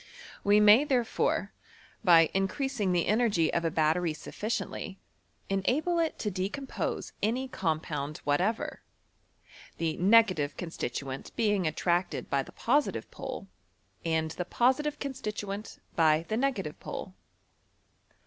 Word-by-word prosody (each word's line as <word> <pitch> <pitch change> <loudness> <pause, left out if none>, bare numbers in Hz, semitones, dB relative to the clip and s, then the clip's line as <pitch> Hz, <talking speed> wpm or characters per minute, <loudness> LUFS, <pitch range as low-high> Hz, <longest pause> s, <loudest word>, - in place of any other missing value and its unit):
We 205 +1 +5
may, 210 +5 +7
therefore, 255 -6 0 0.5
by 165 -3 +6
increasing 205 +2 0
the 175 -2 +2
energy 210 -7 +2
of 170 - +1
a 165 - +2
battery 160 +1 +1
sufficiently, 205 +1 -4 0.5
enable 275 - +1
it 325 -1 0
to 210 - -2
decom 200 +9 -3
pose - - -3
any 245 +5 0
compound 155 - -2
whatever, 180 +10 0 1.0
the 160 -2 -1
negative 185 -7 +4
consti 165 -7 -4
tuent 135 +2 -6
being 205 -6 +2
attracted 175 +3 -1
by 140 - +2
the - - -10
positive 285 +5 0
pole, - - -6 0.6
and 160 -1 0
the 180 - -4
positive 265 +9 +1
constituent 210 -6 -5 0.2
by 160 0 +4
the 220 - 0
negative 240 - -1
pole. 185 - -6
195 Hz, 120 wpm, -29 LUFS, 165-235 Hz, 1.0 s, may